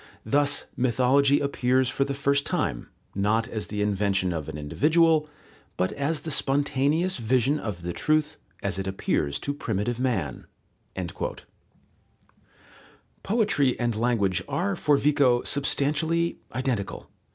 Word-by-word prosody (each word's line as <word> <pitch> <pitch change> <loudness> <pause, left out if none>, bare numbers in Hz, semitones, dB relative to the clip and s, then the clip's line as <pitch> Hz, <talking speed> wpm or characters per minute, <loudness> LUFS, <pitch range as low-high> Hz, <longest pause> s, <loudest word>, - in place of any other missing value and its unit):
Thus 145 0 +1
mythology 130 +3 +3
appears 130 -2 +1
for 135 +3 0
the 140 0 -3
first 140 0 +1
time, - - -2 0.2
not 105 +3 +1
as 110 -2 -4
the 105 0 -2
invention 100 -3 0
of 80 -2 -4
an 75 - -6
individual, 155 - +2 0.5
but 90 +1 0
as 145 +2 -2
the 160 - -5
spontaneous 145 +6 +1
vision 130 +5 +1
of 95 -6 -5
the 85 0 -3
truth 155 - 0 0.3
as 95 -2 -1
it 95 - -3
appears 75 -6 -1
to 140 - -2
primitive 115 -3 -2
man." 105 - -2 2.7
Poetry 200 - +1
and 120 -2 0
language 110 -5 +1
are 195 +3 -1
for 150 -4 +2
Vico 140 -4 +3
substantially 155 +4 +1
identical. 125 -6 -3
130 Hz, 125 wpm, -26 LUFS, 105-145 Hz, 2.7 s, mythology